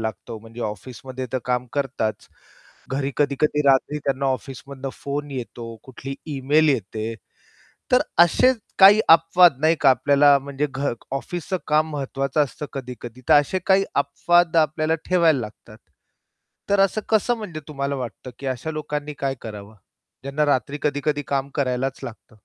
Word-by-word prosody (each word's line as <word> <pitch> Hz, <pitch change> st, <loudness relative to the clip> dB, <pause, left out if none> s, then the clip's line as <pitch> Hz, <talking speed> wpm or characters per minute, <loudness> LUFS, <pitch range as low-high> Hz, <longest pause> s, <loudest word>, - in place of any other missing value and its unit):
लागतो, 110 Hz, +1 st, -5 dB
म्हणजे 115 Hz, +2 st, -12 dB
ऑफिसमध्ये 130 Hz, +4 st, -7 dB
तर 130 Hz, -, +1 dB
काम 125 Hz, 0 st, -1 dB
करताच, 130 Hz, -6 st, -2 dB, 0.6 s
घरी 135 Hz, 0 st, -1 dB
कधी-कधी 150 Hz, +1 st, +1 dB
रात्री 140 Hz, +2 st, +3 dB
त्यांना 140 Hz, -1 st, -1 dB
ऑफिसमधनं 135 Hz, +1 st, -4 dB
फोन 145 Hz, +1 st, -5 dB
येतो, 120 Hz, -3 st, -7 dB
कुठली 135 Hz, +1 st, -8 dB, 0.2 s
ईमेल 150 Hz, +4 st, +3 dB
येते. 110 Hz, -2 st, -1 dB, 0.8 s
तर -, -, +5 dB, 0.2 s
असेच 250 Hz, +8 st, +3 dB, 0.2 s
काही 200 Hz, +3 st, +9 dB
अपवाद 165 Hz, -1 st, +6 dB
नाही 160 Hz, +1 st, +4 dB
का, 140 Hz, -, +5 dB
आपल्याला 140 Hz, +3 st, +5 dB
म्हणजे 140 Hz, +1 st, -3 dB
घ 140 Hz, -1 st, -1 dB, 0.2 s
ऑफिसच 175 Hz, +6 st, -3 dB
काम 155 Hz, +1 st, +2 dB
महत्वाचं 135 Hz, 0 st, -1 dB
असतं 145 Hz, +2 st, -7 dB
कधी-कधी 125 Hz, -2 st, -8 dB
तर -, -, +7 dB
असे 185 Hz, +6 st, -2 dB
काही 195 Hz, 0 st, +4 dB
अपवाद 170 Hz, +4 st, +2 dB
आपल्याला 155 Hz, 0 st, +2 dB
ठेवायला 165 Hz, -6 st, +4 dB
लागतात. 105 Hz, -2 st, -10 dB, 0.9 s
तर 200 Hz, 0 st, +3 dB
असं 195 Hz, +2 st, +2 dB
कसं 220 Hz, +2 st, +2 dB
म्हणजे 180 Hz, -8 st, -6 dB
तुम्हाला 140 Hz, -1 st, -3 dB
वाटतं 130 Hz, 0 st, -7 dB
की 140 Hz, -, -8 dB
अशा 130 Hz, +5 st, -3 dB
लोकांनी 150 Hz, -1 st, -4 dB
काय 135 Hz, -1 st, -1 dB
करावं? 105 Hz, -1 st, -9 dB, 0.5 s
ज्यांना 140 Hz, +2 st, 0 dB
रात्री 145 Hz, +1 st, 0 dB
कधी-कधी 145 Hz, 0 st, 0 dB
काम 140 Hz, 0 st, -1 dB
करायलाच 130 Hz, -1 st, -1 dB
लागतं. 110 Hz, -2 st, -10 dB
140 Hz, 145 wpm, -23 LUFS, 130-155 Hz, 0.9 s, काही